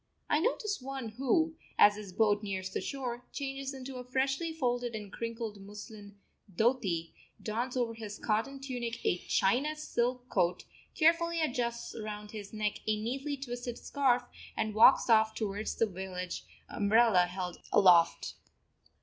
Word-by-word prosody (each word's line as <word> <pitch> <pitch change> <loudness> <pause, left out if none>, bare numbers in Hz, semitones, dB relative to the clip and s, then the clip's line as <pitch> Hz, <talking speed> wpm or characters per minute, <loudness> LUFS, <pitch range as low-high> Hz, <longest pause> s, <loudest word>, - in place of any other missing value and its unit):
I 300 - +4
notice 425 - 0
one 265 -3 -5
who, 275 +8 +1 0.2
as 205 0 +7
his 205 -2 -8
boat 205 +1 +3
nears 190 -2 -4
the - - -2
shore, 250 -3 -4
changes 275 -1 -4
into 265 -1 -7
a 250 - -6
freshly 270 +6 0
folded 245 -6 -1
and 210 -2 -7
crinkled 230 -3 -5
muslin 205 0 -10 0.3
dhoti, 190 -6 +1 0.3
dons 240 +4 -2
over 235 -2 0
his 215 -2 -7
cotton 230 +6 -1
tunic 245 -4 -4
a 175 - +2
China 260 +15 +1
silk 250 -4 -1
coat, 175 -6 +1 0.3
carefully 335 +1 +3
adjusts 240 -6 -1
round 210 -1 -6
his 205 -2 -7
neck 215 -1 -2
a 215 -1 +1
neatly 270 +6 -3
twisted 245 -2 -5
scarf, 265 -4 +1 0.3
and 215 -1 0
walks 225 +5 +7
off 220 -1 +4
towards 210 -1 -2
the 225 - +3
village, 185 -2 -5 0.2
umbrella 210 -4 +4
held 180 -1 -5
aloft. 175 -4 +5
230 Hz, 145 wpm, -31 LUFS, 205-265 Hz, 0.3 s, as